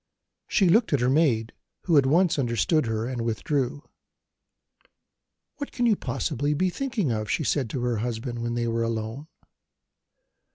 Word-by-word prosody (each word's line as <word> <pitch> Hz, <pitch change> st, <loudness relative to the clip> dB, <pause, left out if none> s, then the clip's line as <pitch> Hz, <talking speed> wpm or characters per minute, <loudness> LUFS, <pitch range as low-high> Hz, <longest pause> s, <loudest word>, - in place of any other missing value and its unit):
She 195 Hz, -, +3 dB
looked 220 Hz, +2 st, +3 dB
at 140 Hz, -, +3 dB
her 125 Hz, +1 st, +2 dB
maid, 125 Hz, -7 st, +2 dB, 0.3 s
who 170 Hz, -, +2 dB
at 140 Hz, -2 st, +5 dB
once 165 Hz, +2 st, +3 dB
understood 130 Hz, +4 st, +1 dB
her, 110 Hz, 0 st, -1 dB
and 125 Hz, -1 st, -3 dB
withdrew. 130 Hz, +4 st, -2 dB, 1.7 s
"What 285 Hz, -1 st, -5 dB
can 245 Hz, -, -1 dB
you 225 Hz, -3 st, +4 dB
possibly 150 Hz, -5 st, -2 dB
be 185 Hz, +4 st, +1 dB
thinking 230 Hz, -, -1 dB
of?" 110 Hz, -1 st, -2 dB
she 155 Hz, -, 0 dB
said 135 Hz, -4 st, 0 dB
to 125 Hz, -, -3 dB
her 120 Hz, -2 st, 0 dB
husband, 120 Hz, +2 st, -3 dB
when 120 Hz, 0 st, -2 dB
they 120 Hz, 0 st, -1 dB
were 115 Hz, 0 st, -1 dB
alone. 115 Hz, +5 st, -3 dB
130 Hz, 160 wpm, -26 LUFS, 115-160 Hz, 1.7 s, at